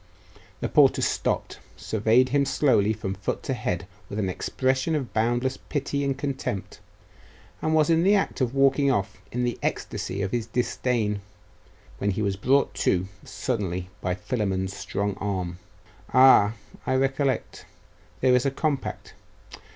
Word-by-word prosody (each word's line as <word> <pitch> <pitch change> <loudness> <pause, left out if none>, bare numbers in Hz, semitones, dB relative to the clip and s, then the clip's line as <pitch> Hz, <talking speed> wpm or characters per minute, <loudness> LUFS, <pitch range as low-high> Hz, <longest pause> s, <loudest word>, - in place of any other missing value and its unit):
The - - 0
porter - - +4
stopped, - - -1 0.2
surveyed 110 +4 +2
him 140 +1 +3
slowly 125 -7 +3
from 95 -3 -3
foot 100 +1 -4
to 135 - -1
head 90 -7 -2 0.2
with 100 - -5
an 100 -3 0
expression 130 - 0
of 135 -5 -3
boundless 120 +4 +1
pity 140 -1 -3
and 135 -1 -1
contempt, 135 -8 -4 0.8
and 155 0 +1
was 155 +1 +4
in 165 0 +4
the 195 +4 +5
act 195 -7 0
of 125 +1 0
walking 135 +1 +4
off 100 -7 -1
in 125 +1 -1
the 120 -1 -1
ecstasy 100 +2 -3
of 95 - -2
his 115 -2 -1
disdain, 115 -3 -1 0.8
when 100 - 0
he 100 +2 -1
was 100 -1 0
brought 135 +8 +2
to 95 +1 +2
suddenly 95 -8 -3
by 90 0 -1
Philammon's 95 -4 -2
strong 100 +1 -2
arm. 90 -3 -3 0.5
'Ah! 130 -5 +6 0.3
I 130 - +2
recollect. 135 -1 -1 0.5
There 130 -1 +4
is 125 0 +4
a - - +3
compact.... 140 0 -3
120 Hz, 150 wpm, -26 LUFS, 100-135 Hz, 0.8 s, Ah